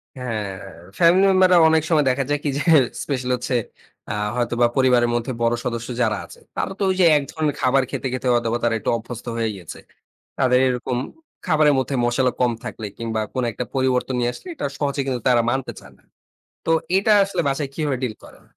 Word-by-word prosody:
হ্যাঁ, 115 -6 -4 0.5
ফ্যামিলি 180 +3 +5
মেম্বাররা 185 -1 +5
অনেক 160 -1 +3
সময় 155 -4 +3
দেখা 135 +1 +1
যায় 145 0 +1
কি 145 - 0
যে, 145 - -1 0.4
স্পেশালি 125 -3 -2
হচ্ছে 125 +1 -3 0.5
আ - - -2 0.2
হয়তোবা 120 0 +1
পরিবারের 125 -2 +4
মধ্যে 120 +2 -2
বড় 115 0 +2
সদস্য 120 -1 -3
যারা 110 -3 +1
আছে - - -15 0.2
তারা - - -2
তো 200 - 0
ওইযে, 185 -1 +3
এক 145 - -1
ধরনের 155 -3 -1
খাবার 130 +1 +3
খেতে, - - -3
খেতে 130 0 -3
হয়তোবা 120 -1 +1
তারা 115 -1 +2
একটু - - -3
অভ্যস্ত 115 +1 -9
হয়ে 115 -1 0
গিয়েছে। 90 -5 -10 0.6
তাদের 125 -1 +3
এরকম 125 0 -2 0.5
খাবারের 155 -2 +4
মধ্যে 130 +1 -1
মশালা 125 +1 +1
কম 125 -1 +3
থাকলে 110 - -6
কিংবা 115 -1 -2
কোনো 130 -1 0
একটা 125 - -4
পরিবর্তন 130 -1 0
নিয়ে 120 0 +1
আসলে 370 - -12
এটা 295 - -3
সহজে 140 -1 -1
কিন্তু 130 -2 -2
তারা 120 -2 +4
মানতে 130 +1 -2
চান - - -16
না। - - -30 0.6
তো, - - +1 0.3
এটা 200 +3 +2
আসলে 195 - -2
বাসায় 140 0 -1
কিভাবে 145 -3 -1
deal 115 -4 -2
করেন? - - -16
130 Hz, 195 wpm, -22 LUFS, 120-145 Hz, 0.6 s, ফ্যামিলি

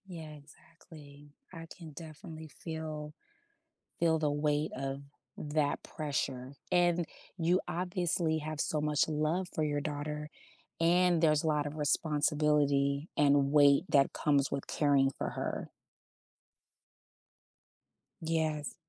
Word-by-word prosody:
Yeah, 165 -4 -8
exactly. 145 0 -16 0.2
I 165 -1 -8
can 165 -3 -10
definitely 160 0 -9 0.2
feel 155 -2 -5 0.9
feel 165 -1 +3
the 150 -2 +1
weight 150 +1 0
of 135 +1 -3 0.4
that 145 -1 -1
pressure, 135 -3 -3 0.2
and 175 -1 +3 0.3
you 175 +2 +2
obviously 175 -2 0
have 155 0 -5
so 150 -1 0
much 150 -1 +2
love 155 +4 0
for 155 - 0
your 145 -1 0
daughter, 150 +1 -4 0.5
and 175 0 +4
there's 155 -2 +3
a - - 0
lot 150 -1 +1
of 145 +1 -5
responsibility 150 -1 +1
and 140 -1 +4
weight 145 -1 +6
that 140 -1 +4
comes 140 -2 +1
with 140 - -3
caring 140 -2 +3
for - - -2
her. - - -4 2.5
Yes. 160 -2 -1
150 Hz, 120 wpm, -32 LUFS, 145-160 Hz, 2.5 s, weight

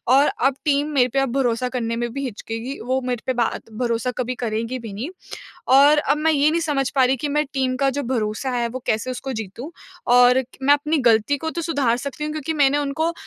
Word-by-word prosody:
और 280 +2 +5 0.2
अब 270 - -1
टीम 290 0 +2
मेरे 250 -3 +4
पे 275 - +2
अब 270 -3 0
भरोसा 250 -1 0
करने 230 -2 -2
में 240 0 -2
भी 275 - -4
हिचकेगी। 230 +3 -6
वो 260 +1 +1
मेरे 245 -2 -2
पे 260 - +1
बात 235 -2 -2
भरोसा 235 +1 0
कभी 255 0 -2
करेगी 230 +3 -2
भी 225 -4 -8
नहीं। 240 - -5 0.7
और 290 +2 +6
अब 295 - +1
मैं 320 +1 +2
ये 295 0 +3
नहीं 335 +2 0
समझ 285 -5 0
पा 260 - +5
रही 260 +1 +2
कि 290 +4 -3
मैं 300 +1 +1
टीम 260 -1 0
का 270 - +4
जो 285 - -1
भरोसा 220 +3 -2
है 235 -1 0
वो 255 +2 -5
कैसे 220 +4 0
उसको 265 +2 -5
जीतू 225 - -7 0.4
और 250 +1 +6 0.2
मैं 285 +2 +6
अपनी 300 +2 0
गलती 225 +5 +4
को 320 +3 -3
तो 335 +1 -4
सुधार 280 -8 +1
सकती 280 +3 -5
हूँ 300 - -3
क्योंकि 310 +1 -3
मैंने 285 -1 +3
उनको 300 +4 -1
260 Hz, 230 wpm, -22 LUFS, 235-290 Hz, 0.7 s, और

